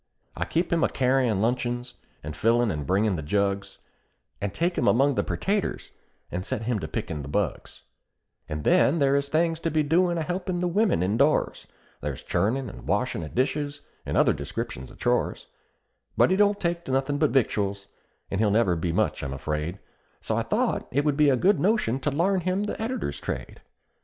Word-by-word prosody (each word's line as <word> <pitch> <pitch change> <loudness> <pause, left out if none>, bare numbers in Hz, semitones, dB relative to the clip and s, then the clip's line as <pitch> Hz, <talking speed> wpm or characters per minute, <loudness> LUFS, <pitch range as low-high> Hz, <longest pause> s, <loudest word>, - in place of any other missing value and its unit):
I - - -2
keep 170 +2 0
him 165 - +2
a - - +3
carryin' 125 -6 +2
luncheons, 120 +1 -1 0.3
and 75 0 -6
fillin' 115 +4 +2
and 75 -4 -4
bringin' 100 +1 +2
the - - -3
jugs, 100 +5 -1 0.6
And 100 -1 -1
take 170 - 0
him 120 - +1
among 140 +4 +4
the - - 0
pertatoes, 200 +1 -2 0.4
and 90 +1 -3
set 115 +1 -3
him 115 -1 0
to 80 - -5
pickin' 75 0 -4
the 70 - -7
bugs; 70 - -3 0.7
And 75 -1 -4
then 150 - +4
there 140 -2 +3
is 140 0 0
things 165 +1 +1
to 165 - -1
be 155 -1 +1
doin' 170 +3 +2
a 165 - -1
helpin' 180 +2 -2
the 180 - 0
women 190 - +2
indoors; 120 +11 +1 0.3
There's 70 -2 -4
churnin' 125 +6 0
and - - -10
washin' 105 0 0
of 80 - -8
dishes, 145 +3 -1 0.2
and - - -2
other - - +5
descriptions 65 +1 -5
of - - -15
chores; - - 0 0.7
But - - +5
he - - +4
don't 205 0 +3
take 170 -1 -1
to - - -4
nothin' 135 +2 0
but 155 - +3
victuals, 100 -6 0 0.5
and 100 - -1
he'll 110 -1 +3
never 100 -4 +3
be 85 +1 -1
much, - - 0
I'm 70 -1 -4
afraid, 75 +5 -3 0.4
So - - -2
I - - +1
thought - - 0
it 145 +3 0
would 150 -2 +2
be 150 0 +4
a 135 - +4
good 200 +9 +3
notion 185 - +1
to 150 - 0
larn 180 +6 +1
him 185 +3 0
the 210 - -4
editor's 250 +4 -3
trade. - - -6
130 Hz, 195 wpm, -26 LUFS, 100-165 Hz, 0.7 s, other